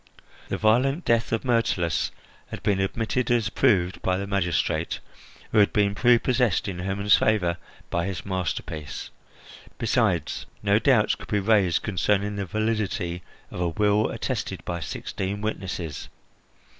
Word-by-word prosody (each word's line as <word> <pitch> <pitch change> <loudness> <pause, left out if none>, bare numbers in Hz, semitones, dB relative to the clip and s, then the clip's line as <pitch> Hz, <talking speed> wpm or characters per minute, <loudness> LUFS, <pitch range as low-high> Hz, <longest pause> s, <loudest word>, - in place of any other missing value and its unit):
The - - -1
violent 130 +9 +2
death 115 -1 +2
of 115 +3 -1
Myrtilus 115 -9 +1 0.4
had - - -8
been 100 -2 +2
admitted 115 +5 -1
as 115 -5 +2
proved 95 -9 +2
by 90 0 +1
the 100 - -3
magistrate, 95 -4 0 0.5
who - - +4
had 100 - +5
been 100 -1 +2
prepossessed 120 -2 +3
in 90 -3 -4
Hermon's 100 +2 +3
favour 90 -6 +1 0.3
by 85 +1 0
his 95 -4 -5
masterpiece. 85 -6 -4 0.7
Besides, 110 - 0 0.2
no 100 +1 +4
doubts 115 -3 +4
could - - -9
be 105 - +1
raised 100 -4 +3
concerning 105 +1 0
the 100 -2 -3
validity 105 -3 -1 0.3
of 90 - -5
a 85 - +1
will 105 +4 +2
attested - - -3
by 85 -1 -3
sixteen 95 +4 -4
witnesses. 95 -8 -4
100 Hz, 140 wpm, -25 LUFS, 90-110 Hz, 0.7 s, had